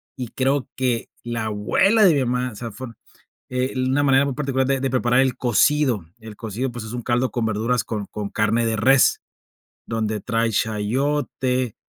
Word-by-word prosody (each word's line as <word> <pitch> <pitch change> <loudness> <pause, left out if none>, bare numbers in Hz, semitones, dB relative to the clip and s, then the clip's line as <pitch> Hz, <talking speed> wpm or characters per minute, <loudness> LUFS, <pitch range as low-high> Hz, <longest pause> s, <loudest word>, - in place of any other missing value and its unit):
y 125 -3 -5
creo 135 +1 0
que 125 -3 -1
la 120 -2 -3
abuela 115 - +2
de 175 - +6
mi 135 -3 +1
mamá, 125 0 -1
o - - -12
sea, 115 +1 -6
fue, 130 +3 -8 0.6
eh, 125 +1 -1
una 130 +3 +1
manera 135 0 +4
muy 140 - -1
particular 135 -2 0
de 135 -1 +1
de 135 - 0
preparar 125 0 +2
el 130 -2 +1
cocido. 125 - +2
El 110 -2 -10
cocido 115 +4 -4
pues 120 -2 -7
es 110 - -7
un 120 - -4
caldo 120 +2 0
con 120 -2 -2
verduras 115 +3 0
con 105 -3 -4
con 105 -1 -6
carne 110 +2 +1
de 110 -1 0
res, 130 +5 +4 0.7
donde 110 -2 -2
trae 115 0 0
chayote, 125 +3 -1
125 Hz, 185 wpm, -22 LUFS, 110-130 Hz, 0.7 s, de